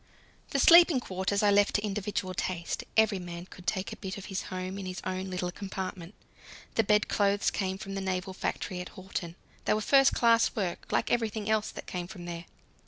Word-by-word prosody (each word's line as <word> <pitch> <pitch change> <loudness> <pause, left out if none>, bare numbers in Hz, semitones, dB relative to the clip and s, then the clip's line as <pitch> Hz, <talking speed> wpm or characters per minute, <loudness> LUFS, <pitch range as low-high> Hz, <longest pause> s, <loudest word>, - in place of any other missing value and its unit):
The - - -1
sleeping 335 0 +8
quarters 195 -1 -1
I 205 - +5
left 205 0 +4
to 205 - +1
individual 200 -2 -2
taste: 175 -2 -3
every 220 -3 +4
man 175 -1 -7
could 180 -1 -14
take 190 -2 -1
a - - -10
bit 190 -1 -5
of 200 - -8
his 190 - -1
home 185 +1 -4
in 190 - -5
his 185 0 -5
own 185 +1 -3
little 180 -1 -2
compartment. 190 -1 -6 0.6
The 225 - +3
bedclothes 205 -1 +2
came 190 -1 -2
from 195 0 -7
the 195 - -3
naval 190 0 -2
factory 185 -1 -3
at 180 - -9
Horten; 185 -3 -5 0.3
they - - +3
were - - 0
first 270 +5 +5
class 230 -1 +4
work, 185 -5 -3
like - - +1
everything 220 -3 0
else 215 -1 +1
that - - -8
came 175 -1 -4
from 175 -1 -9
there. 170 0 -6
190 Hz, 200 wpm, -29 LUFS, 185-210 Hz, 0.6 s, sleeping